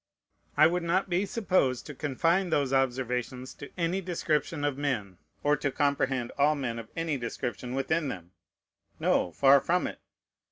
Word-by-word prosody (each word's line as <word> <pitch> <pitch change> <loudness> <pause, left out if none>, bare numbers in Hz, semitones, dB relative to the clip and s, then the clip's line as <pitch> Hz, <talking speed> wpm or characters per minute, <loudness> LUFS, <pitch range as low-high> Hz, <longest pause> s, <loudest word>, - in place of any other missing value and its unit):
I 155 - +8
would 175 +2 +2
not 180 +3 0
be 185 +4 +1
supposed 185 - +1
to 150 - -7
confine 165 +7 +1
those 140 -4 +1
observations 130 -1 -1
to 140 - -10
any 175 +2 0
description 165 -4 -1
of 145 -2 +1
men, 120 -10 -2 0.2
or 145 0 +4
to 145 - -1
comprehend 135 -4 0
all 150 +2 +4
men 120 -5 -3
of 110 - -9
any 165 -4 -1
description 120 0 -4
within 150 +3 0
them, 90 -8 -6 0.7
no, 90 - +2
far 135 +6 +5
from 180 +1 +1
it! - - -5
140 Hz, 160 wpm, -29 LUFS, 130-165 Hz, 0.7 s, I